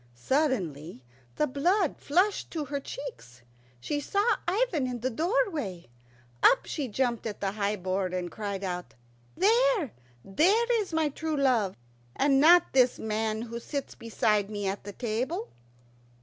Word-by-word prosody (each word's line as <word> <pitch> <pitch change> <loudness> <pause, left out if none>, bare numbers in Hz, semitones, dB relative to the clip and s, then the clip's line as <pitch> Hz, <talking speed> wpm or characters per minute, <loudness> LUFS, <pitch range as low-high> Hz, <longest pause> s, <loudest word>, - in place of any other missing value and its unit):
Suddenly 170 - -1 0.3
the 300 - +2
blood 325 +6 +1
flushed 370 +7 +1
into 305 -2 -2
her 285 0 -3
cheeks. 125 - -9 0.4
She 290 - -2
saw 405 - +1
Ivan 360 - +1
in 245 -2 -4
the 260 +2 -1
doorway. 320 - -1 0.5
Up - - +5
she 290 -4 -3
jumped 240 0 -1
at 210 - -6
the 195 -1 -1
high 205 0 -1
board, 185 -1 -2
and 180 -1 -3
cried 200 -2 -4
out, 180 -2 -4 0.4
"There, 440 - +3 0.3
there 435 - +3
is 395 - -6
my 320 -2 +1
true 315 +1 -3
love, 240 -9 +2 0.4
and 275 -1 +3
not 345 +4 +6
this 255 -2 +4
man 220 0 -2
who 235 0 -6
sits 280 +3 -5
beside 210 -3 0
me 205 -1 -4
at 195 0 -3
the 205 - -7
table." 255 - -3
255 Hz, 150 wpm, -28 LUFS, 205-320 Hz, 0.5 s, not